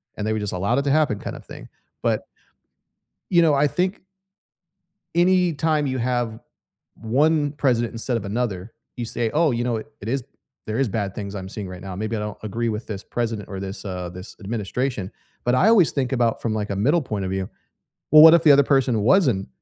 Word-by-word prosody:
and 105 Hz, -, -3 dB
they 110 Hz, -, +1 dB
were 110 Hz, -, -1 dB
just 105 Hz, -1 st, -3 dB
allowed 100 Hz, +7 st, 0 dB
it -, -, -1 dB
to 140 Hz, -, 0 dB
happen 145 Hz, -9 st, +2 dB
kinda -, -, -6 dB
thing, -, -, -12 dB, 0.3 s
but -, -, 0 dB, 1.0 s
you 175 Hz, -2 st, +5 dB
know, 160 Hz, -3 st, +4 dB
I 145 Hz, +1 st, +3 dB
think 185 Hz, +6 st, -1 dB, 1.1 s
anytime 170 Hz, -4 st, +2 dB
you 130 Hz, -, -2 dB
have 120 Hz, -2 st, -1 dB
v 110 Hz, -, -12 dB, 0.6 s
1 145 Hz, +5 st, +2 dB
president 120 Hz, -5 st, 0 dB
instead 115 Hz, +1 st, -2 dB
of 110 Hz, -, -6 dB
another, 105 Hz, -2 st, -3 dB, 0.2 s
you 120 Hz, -, -3 dB
say, 115 Hz, 0 st, -2 dB
“Oh, 155 Hz, -2 st, +3 dB
you 120 Hz, 0 st, -1 dB
know 120 Hz, -1 st, -1 dB
what 110 Hz, +6 st, -5 dB
it 110 Hz, -, -5 dB
is? 135 Hz, +1 st, -1 dB, 0.4 s
There 110 Hz, +1 st, -2 dB
is 135 Hz, -3 st, +1 dB
bad 100 Hz, -2 st, -3 dB
things 100 Hz, -1 st, -6 dB
I'm 95 Hz, -1 st, -6 dB
seeing 100 Hz, -2 st, -6 dB
right 90 Hz, -1 st, -9 dB
now. 95 Hz, -1 st, -7 dB
Maybe 110 Hz, +3 st, -3 dB
I -, -, -3 dB
don't 105 Hz, -1 st, -5 dB
agree 115 Hz, +3 st, -2 dB
with 110 Hz, +1 st, -4 dB
this 100 Hz, -2 st, -6 dB
president 115 Hz, -3 st, -3 dB
or 95 Hz, -, -6 dB
this 95 Hz, +2 st, -7 dB
uh, 90 Hz, -2 st, -4 dB
this 90 Hz, +4 st, -10 dB
administration,” 105 Hz, 0 st, -3 dB, 0.3 s
but 120 Hz, -, +2 dB
I 185 Hz, -, +4 dB
always 215 Hz, -8 st, +5 dB
think 135 Hz, -3 st, -1 dB
about 120 Hz, -3 st, +1 dB
from, 115 Hz, -, -1 dB
like, 105 Hz, -1 st, -3 dB
a -, -, -2 dB
middle 145 Hz, -, +2 dB
point 105 Hz, -6 st, -3 dB
of 95 Hz, -, -3 dB
view. 95 Hz, -1 st, -2 dB, 0.6 s
Well, 155 Hz, +1 st, +9 dB
what 160 Hz, +1 st, +10 dB
if 170 Hz, -, +4 dB
the 150 Hz, -, +8 dB
other 140 Hz, 0 st, +6 dB
person 130 Hz, -5 st, +2 dB
wasn't 120 Hz, -, +3 dB
115 Hz, 215 wpm, -23 LUFS, 105-140 Hz, 1.1 s, what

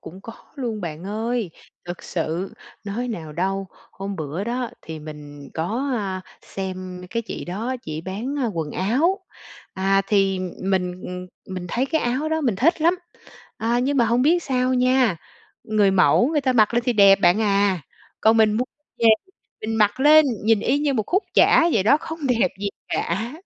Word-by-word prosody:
Cũng 185 Hz, +3 st, -11 dB
có 230 Hz, -, -9 dB, 0.2 s
luôn 240 Hz, -7 st, -4 dB
bạn 165 Hz, -1 st, -6 dB
ơi. 220 Hz, 0 st, -2 dB, 0.3 s
Thực 175 Hz, 0 st, -7 dB
sự, 170 Hz, +2 st, -3 dB, 0.3 s
nói 225 Hz, +5 st, -3 dB
nào 165 Hz, -9 st, -6 dB
đâu, 195 Hz, +4 st, -2 dB, 0.3 s
hôm 195 Hz, 0 st, -6 dB
bữa 155 Hz, +5 st, -4 dB
đó 240 Hz, +1 st, -2 dB
thì 160 Hz, 0 st, -7 dB
mình 150 Hz, -2 st, -10 dB
có, 225 Hz, -, -2 dB
à, 190 Hz, -4 st, -3 dB, 0.2 s
xem 185 Hz, -1 st, -6 dB
cái 230 Hz, 0 st, -2 dB
chị -, -, -6 dB
đó, 225 Hz, +9 st, -3 dB
chỉ 155 Hz, 0 st, -5 dB
bán, 205 Hz, -, -4 dB
a, 260 Hz, -, +1 dB
quần 165 Hz, -8 st, -3 dB
áo. 265 Hz, -, +1 dB, 0.6 s
À, 195 Hz, +1 st, +2 dB
thì 195 Hz, -2 st, +2 dB, 0.2 s
mình, 185 Hz, -1 st, -1 dB
ừm, 180 Hz, 0 st, -6 dB, 0.3 s
mình 180 Hz, -1 st, -5 dB
thấy 245 Hz, +9 st, 0 dB
cái 320 Hz, +3 st, 0 dB
áo 255 Hz, +6 st, -1 dB
đó 320 Hz, 0 st, 0 dB
mình 245 Hz, -10 st, 0 dB
thích 315 Hz, -, +2 dB
lắm. 340 Hz, +3 st, +4 dB, 0.6 s
À, 235 Hz, +2 st, 0 dB
nhưng 275 Hz, +3 st, 0 dB
mà 240 Hz, -, +4 dB
hông 235 Hz, +2 st, +2 dB
biết 340 Hz, +5 st, +3 dB
sao 255 Hz, -1 st, 0 dB
nha, 255 Hz, -5 st, +3 dB, 0.5 s
người 210 Hz, -2 st, +3 dB
mẫu 195 Hz, +5 st, +4 dB
người 305 Hz, -1 st, +1 dB
ta 260 Hz, -2 st, +1 dB
mặc 220 Hz, -2 st, +3 dB
lên 240 Hz, -, +2 dB
thì 245 Hz, -, +3 dB
đẹp 200 Hz, -3 st, +6 dB
bạn 175 Hz, +4 st, +4 dB
à, 200 Hz, -3 st, +2 dB, 0.4 s
còn 220 Hz, +1 st, +4 dB
mình 220 Hz, -1 st, +4 dB
mu 230 Hz, +4 st, 0 dB, 0.3 s
về 230 Hz, -, +3 dB, 0.5 s
mình 220 Hz, +1 st, -3 dB
mặc 210 Hz, +4 st, +2 dB
lên 305 Hz, +2 st, +7 dB, 0.2 s
nhìn 220 Hz, -1 st, +4 dB
y 265 Hz, +6 st, +1 dB
như 290 Hz, -1 st, 0 dB
một 220 Hz, -, +1 dB
khúc 375 Hz, +4 st, +1 dB
chả 335 Hz, -, +5 dB
vậy 205 Hz, -, +3 dB
đó, 230 Hz, +9 st, +5 dB
không 320 Hz, -, -6 dB
đẹp 235 Hz, -7 st, +2 dB
gì 205 Hz, -, -1 dB, 0.2 s
cả! 215 Hz, +8 st, -2 dB
215 Hz, 190 wpm, -22 LUFS, 185-250 Hz, 0.6 s, lên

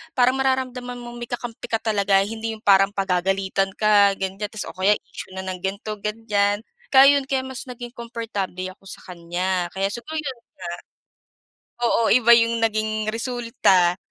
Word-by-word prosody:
parang 255 Hz, +1 st, +3 dB
mararamdaman 255 Hz, -2 st, -1 dB
mong 240 Hz, 0 st, -9 dB
may 240 Hz, -, -6 dB
kakampi 240 Hz, -1 st, -6 dB
ka 225 Hz, -1 st, -2 dB
talaga 200 Hz, -3 st, +3 dB
hindi 225 Hz, +1 st, -4 dB
yung 215 Hz, -, -24 dB
parang 195 Hz, -1 st, +5 dB
pagagalitan 195 Hz, +1 st, 0 dB
ka 205 Hz, -2 st, +5 dB
ganiyan 195 Hz, +2 st, -3 dB
tas 215 Hz, -, -5 dB
o -, -, -7 dB
kaya 190 Hz, +3 st, +3 dB
issue 185 Hz, -, -10 dB
na 190 Hz, -, -5 dB
ng 185 Hz, -1 st, -5 dB
ganito, 200 Hz, +3 st, -4 dB
ganiyan. 210 Hz, -1 st, 0 dB, 0.3 s
Kaya 275 Hz, +2 st, +8 dB
yun, 275 Hz, -, -2 dB
kaya 265 Hz, -2 st, 0 dB
mas 260 Hz, 0 st, -7 dB
naging 245 Hz, -1 st, -8 dB
komportable 230 Hz, -6 st, -5 dB
ako 190 Hz, -, -21 dB
sa -, -, -9 dB
kanya, 175 Hz, +1 st, -2 dB
kaya 195 Hz, +1 st, 0 dB
siguro 240 Hz, +8 st, -7 dB
yun 280 Hz, -5 st, -3 dB, 0.3 s
nga. 175 Hz, -, -6 dB, 1.1 s
Oo, 235 Hz, -, +3 dB
iba 235 Hz, 0 st, +4 dB
yung 230 Hz, 0 st, +2 dB
naging 215 Hz, -1 st, 0 dB
resulta, 230 Hz, -7 st, +2 dB
215 Hz, 165 wpm, -23 LUFS, 195-240 Hz, 1.1 s, Kaya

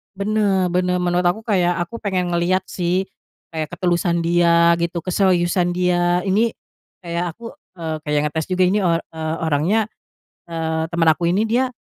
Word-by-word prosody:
Benar 200 Hz, -3 st, +1 dB
benar, 180 Hz, 0 st, +1 dB
menurut 180 Hz, 0 st, +1 dB
aku 185 Hz, +6 st, -1 dB
kayak 180 Hz, -6 st, +1 dB
aku 200 Hz, +8 st, -4 dB
pengen 185 Hz, -4 st, -1 dB
ngeliat 175 Hz, +2 st, +1 dB
sih, 180 Hz, +1 st, 0 dB, 0.5 s
kayak 160 Hz, -1 st, -3 dB
ketulusan 175 Hz, -1 st, 0 dB
dia 170 Hz, 0 st, +4 dB
gitu, 170 Hz, 0 st, -2 dB
keseriusan 175 Hz, -1 st, +1 dB
dia, 175 Hz, 0 st, +1 dB
ini, 215 Hz, +4 st, +1 dB, 0.5 s
kayak 170 Hz, -1 st, -3 dB
aku, 230 Hz, -1 st, -9 dB, 0.2 s
eee, 160 Hz, -3 st, -4 dB
kayak 150 Hz, -1 st, -1 dB
ngetes 160 Hz, 0 st, -3 dB
juga 185 Hz, 0 st, +1 dB
ini, 185 Hz, +3 st, +2 dB
o 175 Hz, -4 st, +2 dB
eee, 160 Hz, -1 st, -4 dB
orangnya, 175 Hz, +9 st, +1 dB, 0.5 s
eee, 160 Hz, -1 st, -2 dB
teman 165 Hz, -1 st, +2 dB
aku 160 Hz, +2 st, +2 dB
ini 215 Hz, +4 st, +1 dB
dia, 255 Hz, +2 st, +1 dB
175 Hz, 155 wpm, -20 LUFS, 170-190 Hz, 0.5 s, dia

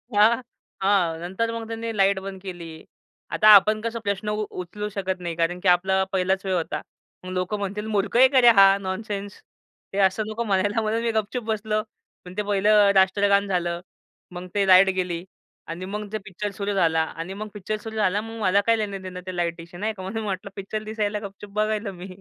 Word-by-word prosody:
हां, 225 Hz, +4 st, +5 dB, 0.4 s
हां. 190 Hz, -4 st, +2 dB
नंतर 190 Hz, +6 st, -2 dB
मग 230 Hz, -1 st, -5 dB
त्यांनी 225 Hz, 0 st, -4 dB
लाईट 195 Hz, 0 st, +3 dB
बंद 190 Hz, 0 st, -8 dB
केली. 170 Hz, -4 st, -8 dB, 0.5 s
आता 215 Hz, -, +3 dB
आपण 215 Hz, +2 st, +4 dB
कसं 230 Hz, +1 st, -3 dB
प्रश्न 200 Hz, +1 st, -2 dB
उ 210 Hz, 0 st, -1 dB
उचलू 205 Hz, +4 st, -6 dB
शकत 190 Hz, -2 st, -3 dB
नाही, 170 Hz, -2 st, -4 dB
कारण 170 Hz, +2 st, 0 dB
की 185 Hz, -, -2 dB
आपला 190 Hz, +2 st, +3 dB
पहिलाच 190 Hz, +1 st, 0 dB
वेळ 190 Hz, -, 0 dB
होता. 170 Hz, -2 st, -2 dB, 0.4 s
मग 185 Hz, -, -7 dB
लोक 185 Hz, +2 st, -2 dB
म्हणतील 205 Hz, +1 st, -3 dB
"मूर्ख 205 Hz, +1 st, 0 dB
आहे 260 Hz, +1 st, +8 dB
का 260 Hz, -, +7 dB
रे 240 Hz, -, +8 dB
हा, 195 Hz, 0 st, +7 dB
नॉनसेन्स." 200 Hz, +1 st, -5 dB, 0.5 s
ते -, -, -4 dB
असं 190 Hz, +3 st, -3 dB
नको 220 Hz, +2 st, -3 dB
म्हणायला, 205 Hz, +1 st, +1 dB
म्हणून 220 Hz, +1 st, -1 dB
मी 235 Hz, -, +1 dB
गप 220 Hz, -2 st, 0 dB
चूप 250 Hz, -2 st, -2 dB
बसलो. 215 Hz, -1 st, -1 dB, 0.4 s
पण 180 Hz, -, -9 dB
ते -, -, +1 dB
पहिलं 205 Hz, 0 st, +4 dB
राष्ट्रगान 200 Hz, +1 st, +3 dB
झालं, 175 Hz, -2 st, -1 dB, 0.5 s
मग 180 Hz, +1 st, -7 dB
ते 200 Hz, -1 st, +2 dB
लाईट 190 Hz, +1 st, +7 dB
गेली 175 Hz, -1 st, -2 dB, 0.5 s
आणि 175 Hz, +3 st, -5 dB
मग 210 Hz, +2 st, -5 dB
ते -, -, 0 dB
पिक्चर 205 Hz, +1 st, -5 dB
सुरू 200 Hz, 0 st, -3 dB
झाला. 165 Hz, -4 st, +2 dB
आणि 165 Hz, +3 st, -6 dB
मग 215 Hz, +2 st, -6 dB
पिक्चर 210 Hz, +1 st, -4 dB
सुरू 220 Hz, 0 st, -7 dB
झाला, 205 Hz, -1 st, +1 dB
मग 225 Hz, +1 st, -8 dB
मला 200 Hz, 0 st, +3 dB
काय 230 Hz, -, +5 dB
लेणं-देणं 195 Hz, -4 st, -5 dB
ते 185 Hz, -1 st, -6 dB
लाईटीशी 170 Hz, 0 st, -4 dB
नाही 215 Hz, +4 st, -2 dB
का. 190 Hz, -3 st, -9 dB
म्हणून 220 Hz, +4 st, -4 dB
म्हटलं, 195 Hz, -1 st, -4 dB
पिक्चर 205 Hz, +2 st, -5 dB
दिसायला 215 Hz, -1 st, -2 dB
गपचूप 200 Hz, +1 st, -13 dB
बघायला 215 Hz, 0 st, -1 dB
मी. 180 Hz, 0 st, -9 dB
200 Hz, 205 wpm, -24 LUFS, 185-215 Hz, 0.5 s, आहे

